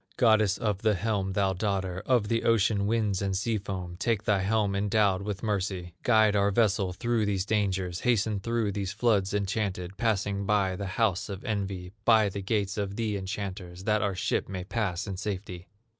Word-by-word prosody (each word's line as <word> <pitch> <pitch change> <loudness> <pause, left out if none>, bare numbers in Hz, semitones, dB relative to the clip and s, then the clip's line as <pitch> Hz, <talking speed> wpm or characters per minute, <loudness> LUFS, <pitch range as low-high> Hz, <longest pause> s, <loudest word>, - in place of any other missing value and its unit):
Goddess 110 -4 +4
of 105 -3 -1
the 110 -2 +3
helm, 100 -1 -1
thou 95 -1 +1
daughter 95 -1 -2
Of 120 -5 +3
the 115 +1 +1
ocean 105 -3 +2
winds 105 -3 +1
and 95 -1 0
sea 110 +2 0
foam, 90 -3 -6
Take 110 -2 0
thy 105 -3 +2
helm 100 +1 +1
endowed 100 -1 +2
with 100 0 -5
mercy, 95 -4 -2
Guide 110 -3 +4
our 100 0 +3
vessel 100 -3 +2
through 115 +3 0
these 100 -2 0
dangers, 95 -4 0
Hasten 110 -3 +1
through 115 0 -1
these 100 -1 -3
floods 105 -4 +2
enchanted, 95 -2 -2
Passing 100 -3 0
by 100 -3 +2
the 100 +1 -4
house 105 -2 +1
of 100 +4 -6
envy, 100 -5 -3
By 110 -3 +5
the 100 +1 -5
gates 100 +1 -1
of 100 -1 -3
the 110 -2 -1
enchanters, 95 -2 -5
That 105 0 +2
our 100 -2 0
ship 90 - -1
may 95 -2 -4
pass 95 -3 -2
in 100 -3 -5
safety! 95 -3 -5
100 Hz, 185 wpm, -28 LUFS, 95-110 Hz, -, By